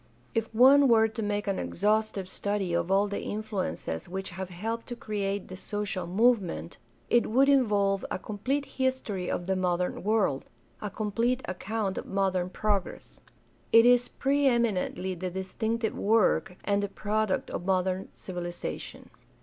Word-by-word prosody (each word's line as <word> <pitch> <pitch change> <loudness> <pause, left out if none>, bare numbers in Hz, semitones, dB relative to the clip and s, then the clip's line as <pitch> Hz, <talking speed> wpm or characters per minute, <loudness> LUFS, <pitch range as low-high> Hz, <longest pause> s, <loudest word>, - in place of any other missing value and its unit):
If 225 -1 -1
one 270 +5 +7
were 225 -2 +5
to 220 +1 -6
make 205 0 -1
an 195 -2 -1
exhaustive 210 -1 0
study 200 -2 -2
of 170 - 0
all 195 +2 +3
the 200 - -3
influences 200 - -4
which 190 +1 -4
have 190 +1 -6
helped 225 +6 -4
to 240 - -5
create 200 -3 -3
the 185 - -8
social 200 -2 -4
movement 205 -1 +1 0.3
it 240 - +4
would 265 +5 +4
involve 205 -8 +3
a - - -2
complete 250 +9 -2
history 260 -10 -2
of 175 - -2
the 190 +1 0
modern 180 -1 0
world 205 -10 +1 0.2
— - - -33
a 210 - -3
complete 230 +5 -1
account 195 +1 -2
of - - -8
modern 190 -2 0
progress. 205 -1 -2 0.5
It 230 +1 +8
is 245 0 +5
pre 280 +1 +1
eminently 205 -6 +1
the 185 +1 -4
distinctive 220 +5 -2
work 210 -3 +2
and 200 0 +1
the 200 - -2
product 210 0 -1
of 175 - -4
modern 185 0 0
civilization. 175 -2 -6
205 Hz, 155 wpm, -28 LUFS, 185-225 Hz, 0.5 s, It